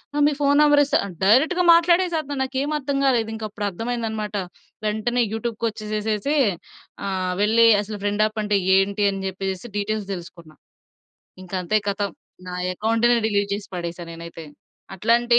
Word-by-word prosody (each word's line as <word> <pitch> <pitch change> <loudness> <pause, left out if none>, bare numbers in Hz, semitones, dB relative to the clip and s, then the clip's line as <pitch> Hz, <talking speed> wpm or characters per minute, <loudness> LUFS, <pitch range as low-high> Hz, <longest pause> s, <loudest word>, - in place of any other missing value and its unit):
ఆహ్, 295 - +3
మీ 295 - +1
phone 285 0 +3
number 295 -1 +5
ఇస్త" 285 +2 -1 0.3
డైరెక్ట్‌గా 295 - +4
మాట్లాడేసత్తునాడు 335 -4 +2
నాకేమి 270 +3 -2
అర్థం 280 0 -2
గాలేదు 235 -4 +2
ఇంకప్పుడర్థమైందన్నమాట. 215 +1 -4 0.5
వెంటనే 220 +3 0
యూట్యూబ్‌కొచ్చేసేసేసి 220 +1 -2 0.7
ఆహ్, 185 -1 -1
వెళ్లి 225 +2 +5
అసలు 210 0 -7
ఫ్రెండ్ 205 +1 +1
యాపంటే 215 -1 0 0.2
ఏంటి? 200 +2 +1
అని 195 0 -5
జెప్పేసేసి 190 +3 -4
డీటెయిల్స్ 205 0 -2
దెలుసుకున్నా. 170 -3 -10 0.9
ఇంక 185 - -16
అంతే 215 +5 +2
కథం 200 -1 -1 0.4
నా 180 - -5 0.2
అకౌంట్‌నే 230 +4 +2
డిలీట్ 200 -1 0
చేసి 205 - -10
పడేసా 175 0 -5
నేనైతే. 165 0 -9 0.5
అట్లాంటి 235 +4 +3
215 Hz, 130 wpm, -23 LUFS, 200-245 Hz, 0.9 s, number